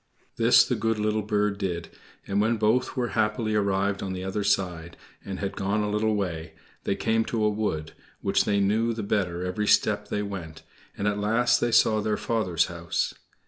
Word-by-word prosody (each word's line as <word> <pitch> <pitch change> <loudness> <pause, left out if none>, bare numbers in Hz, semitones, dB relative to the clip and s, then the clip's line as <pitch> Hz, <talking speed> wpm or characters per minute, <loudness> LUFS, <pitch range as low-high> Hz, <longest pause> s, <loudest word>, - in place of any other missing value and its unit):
This 115 +1 +6
the - - -1
good 115 -1 0
little 105 0 0
bird 105 -1 0
did, 90 -4 -3 0.4
and 100 +1 0
when 115 +2 +2
both 110 +5 +1
were 120 -2 0
happily 105 +2 0
arrived 100 -1 +1
on 95 -1 -3
the 90 0 -5
other 95 +2 -2
side, 90 -4 -1 0.3
and 95 -1 -5
had 100 -1 -3
gone 100 +2 0
a 105 - -1
little 105 +1 +1
way, 85 -5 -3 0.3
they 100 - +1
came 115 0 +1
to 115 -2 -1
a 105 - +4
wood, 80 -8 -2 0.3
which - - +2
they 100 -1 +2
knew 110 +4 +2
the 110 -1 -4
better 90 -4 -1
every 105 +3 -2
step - - +3
they 105 - -2
went, 85 -6 -7 0.3
and 100 - -1
at 105 0 0
last 115 +4 +2
they 120 - +1
saw 110 -1 +4
their 105 0 0
father's 105 -8 0
house. - - -2
105 Hz, 195 wpm, -26 LUFS, 95-110 Hz, 0.4 s, This